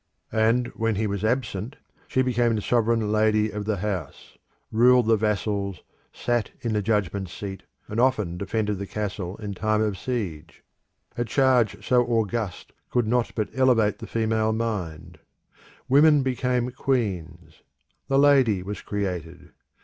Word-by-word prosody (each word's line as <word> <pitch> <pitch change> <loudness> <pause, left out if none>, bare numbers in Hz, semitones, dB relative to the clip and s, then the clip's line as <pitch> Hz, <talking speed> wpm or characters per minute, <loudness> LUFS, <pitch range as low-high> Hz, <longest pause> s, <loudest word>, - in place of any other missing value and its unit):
And 115 +3 +3
when 115 -1 -1
he 110 +3 0
was 100 -1 -3
absent, 115 0 -1 0.3
she 130 - +1
became 120 -2 +1
the 105 - -1
sovereign 115 -2 +1
lady 110 0 +2
of 105 -1 -5
the 110 -1 -1
house, 95 -6 -5 0.4
ruled 125 +2 +5
the 115 0 +4
vassals, 100 -3 -1 0.3
sat 120 -3 -1
in 115 -2 -2
the 105 - +1
judgment 100 -2 -1
seat, 95 +2 -7 0.3
and 110 - -3
often 110 -9 +2
defended 105 +2 -2
the 100 - -5
castle 100 -3 -4
in 105 -2 -5
time 110 +2 0
of 105 -3 -1
siege. 90 -11 -5 0.6
A - - +2
charge 125 -3 +2
so 125 -1 +4
august 115 -4 -2 0.2
could 120 -2 +1
not 120 +2 +1
but 110 -3 -1
elevate 125 -5 +3
the - - -8
female 110 -1 0
mind. 90 -8 -4 0.7
Women 145 +1 +5
became 125 -1 0
queens. 90 -11 -3 0.5
The 135 - +2
Lady 135 -9 +4
was 100 +2 -6
created. 90 -4 -4
110 Hz, 145 wpm, -25 LUFS, 100-120 Hz, 0.7 s, ruled